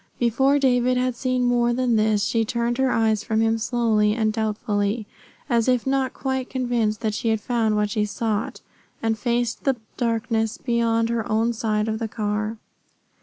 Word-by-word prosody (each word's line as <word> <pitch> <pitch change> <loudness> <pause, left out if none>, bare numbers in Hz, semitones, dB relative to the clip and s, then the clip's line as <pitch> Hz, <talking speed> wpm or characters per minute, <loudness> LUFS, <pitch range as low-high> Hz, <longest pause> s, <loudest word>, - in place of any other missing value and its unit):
Before 265 +4 +2
David 250 -2 +2
had 250 -1 0
seen 255 0 0
more 240 -1 +2
than 250 -1 +1
this 215 -1 +2
she 230 -1 +1
turned 235 +2 -1
her 265 -1 +3
eyes 220 -3 +1
from 220 0 0
him 225 0 +2
slowly 220 -3 +1
and 220 -2 +1
doubtfully, 210 0 -1 0.4
as 235 -3 +1
if 250 -2 +2
not 265 -1 +1
quite 265 -1 -3
convinced 240 -5 -1
that 215 -2 -1
she 225 - -3
had 220 -1 +1
found 225 -1 0
what 210 0 0
she 210 0 +1
sought, 215 0 -3 0.4
and 225 0 +1
faced 240 +1 -1
the 270 -2 +2 0.2
darkness 225 0 0
beyond 230 -2 +1
her 230 -2 -2
own 225 +2 +2
side 215 -1 -1
of 220 0 -2
the 225 - -2
car. 215 0 -2
230 Hz, 175 wpm, -23 LUFS, 215-245 Hz, 0.4 s, her